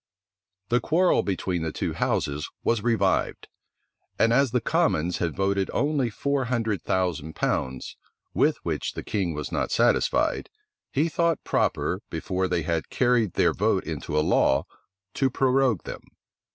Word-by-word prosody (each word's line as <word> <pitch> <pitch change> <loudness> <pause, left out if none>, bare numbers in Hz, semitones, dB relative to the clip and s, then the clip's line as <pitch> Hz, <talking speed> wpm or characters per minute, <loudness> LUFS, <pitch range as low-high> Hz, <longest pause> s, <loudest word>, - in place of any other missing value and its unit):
The 120 - +3
quarrel 175 +6 +3
between 90 -3 -2
the 80 -1 -2
two - - -3
houses 75 +1 -1
was 115 -2 +1
revived; 105 -4 0 0.7
and 115 +1 +3
as 135 +2 +4
the 125 +2 +1
commons 115 - +1
had 85 -3 -1
voted 95 0 0
only 140 -2 +1
four 140 +4 -1
hundred 115 -4 -1
thousand 85 -4 -1
pounds, 65 -1 -2 0.4
with - - +2
which - - -2
the - - -6
king 90 -6 -2
was 75 -1 -5
not - - -1
satisfied, - - +2 0.4
he 150 +4 +1
thought 165 0 0
proper, - - 0
before 95 0 -2
they 90 -2 -1
had 85 0 -2
carried 120 -6 +2
their - - +3
vote - - +1
into 75 - -4
a 75 - +2
law, 65 +1 +3 0.5
to 135 - +1
prorogue 130 -4 +2
them. - - -7
105 Hz, 150 wpm, -25 LUFS, 85-130 Hz, 0.7 s, as